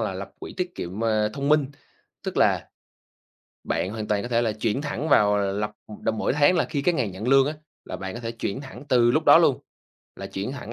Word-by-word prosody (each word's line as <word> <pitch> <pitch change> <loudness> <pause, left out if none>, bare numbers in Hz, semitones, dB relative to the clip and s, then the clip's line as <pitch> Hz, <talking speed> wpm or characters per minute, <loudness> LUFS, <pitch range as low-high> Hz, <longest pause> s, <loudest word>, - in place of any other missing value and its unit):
là - - -1
lập - - -6
quỹ - - -8
tiết 180 -1 -3
kiệm, 95 +6 -4
à, 110 -1 +2
thông 140 +3 -3
minh. 150 -2 +4 0.6
Tức - - -4
là - - +2 1.0
bạn 95 - -1
hoàn 110 -1 -5
toàn 105 -1 +1
có 120 - -5
thể 120 -1 +2
là 110 -2 0
chuyển 110 +4 -1
thẳng 150 +1 -3
vào 105 -7 +4
là 100 -1 0
lập 105 +1 -2 0.3
đồ - - +1
mỗi 110 - -1
tháng 145 +6 +4
là 175 - +2
khi 145 -3 -3
cái 175 +3 +2
ngày 125 -7 0
nhận 100 +6 -5
lương 135 0 +5
á, 150 - -1 0.3
là - - -6
bạn 95 0 -6
có 120 - -6
thể 115 -1 -4
chuyển 115 +2 -4
thẳng 135 -1 -10
từ 120 -2 +4
lúc - - +1
đó - - +8
luôn, - - +3 0.6
là - - -6
chuyển 100 +7 -4
thẳng 120 -5 -7
115 Hz, 245 wpm, -25 LUFS, 105-140 Hz, 1.0 s, đó